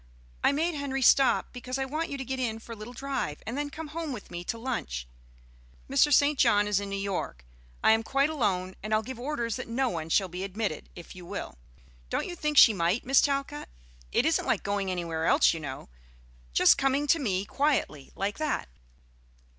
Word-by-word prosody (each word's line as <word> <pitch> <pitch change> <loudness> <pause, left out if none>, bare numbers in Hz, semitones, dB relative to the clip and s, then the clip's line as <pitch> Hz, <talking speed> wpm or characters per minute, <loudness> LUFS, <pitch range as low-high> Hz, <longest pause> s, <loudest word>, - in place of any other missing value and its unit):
I - - +5
made 325 +5 0
Henry 275 -2 -2
stop, 270 +1 +4
because 250 +1 -5
I 270 - -1
want 310 +5 -3
you 280 - -4
to 265 - -5
get 265 +1 -3
in 230 -3 -1
for 230 +1 -12
a - - -5
little 215 +2 -9
drive 270 - -3
and 225 - -4
then 290 0 -2
come 310 +2 -7
home 325 0 -4
with 245 -6 -8
me 175 0 -5
to 230 - -3
lunch. 65 - -4 0.8
Mr. 295 - +3
St. 285 0 +4
John 205 0 +4
is 205 -2 +2
in 200 0 -5
New 200 - -3
York. 195 - -4 0.4
I - - +6
am 225 0 +4
quite 275 +6 +1
alone, 190 -10 -1
and 215 +1 0
I'll 215 - +1
give 255 +2 -7
orders 240 -4 -2
that 255 - -6
no 255 +3 0
one 165 -4 -4
shall 190 +3 +3
be 180 +1 -6
admitted, 195 -4 -3
if 175 0 -11
you 180 - -10
will. 120 - -7 0.5
Don't - - -1
you 350 - -6
think 300 -3 -2
she 225 - +9
might, 180 +4 0
Miss 270 +2 +5
Talcott? 275 - -2 0.4
It - - +2
isn't - - +1
like - - +1
going 200 -1 -1
anywhere 165 -3 -2
else, - - +5
you 165 - -4
know, 140 -4 -7 0.6
just - - +5
coming 270 +1 +2
to 330 +3 +3
me 195 -7 -1
quietly 270 - -1
like 200 +5 -2
that." 305 - -1
230 Hz, 210 wpm, -28 LUFS, 185-275 Hz, 0.8 s, she